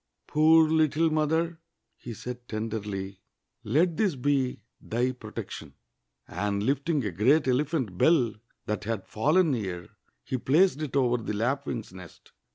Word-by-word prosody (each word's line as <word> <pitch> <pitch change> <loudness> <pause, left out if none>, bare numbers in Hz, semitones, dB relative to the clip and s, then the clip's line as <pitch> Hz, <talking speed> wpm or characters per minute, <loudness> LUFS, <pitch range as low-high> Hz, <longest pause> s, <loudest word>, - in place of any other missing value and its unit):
"Poor 160 +1 +5
little 160 0 +2
mother!" 160 +2 0 0.4
he 120 - -9
said 125 +2 -8
tenderly, 105 -3 -4 0.4
"let 165 +2 +1
this 200 -8 +1
be 130 -4 0 0.2
thy 120 +3 -1
protection!" 125 - -8 0.5
And. 100 0 -2
Hfting 140 +2 0
a 100 - -1
great 130 - +3
ele 130 +3 +2
phant 130 - -3
bell 130 -9 +4 0.3
that 105 -2 -3
had 110 -4 -3
fallen 155 +9 +2
near, 95 -8 -4 0.3
he 130 - -3
placed 155 +4 +3
it 145 -3 -4
over 125 -3 +3
the 110 -2 -4
lap'^'ing's 120 -1 -2
nest. 90 -3 -13
130 Hz, 140 wpm, -27 LUFS, 110-155 Hz, 0.5 s, Poor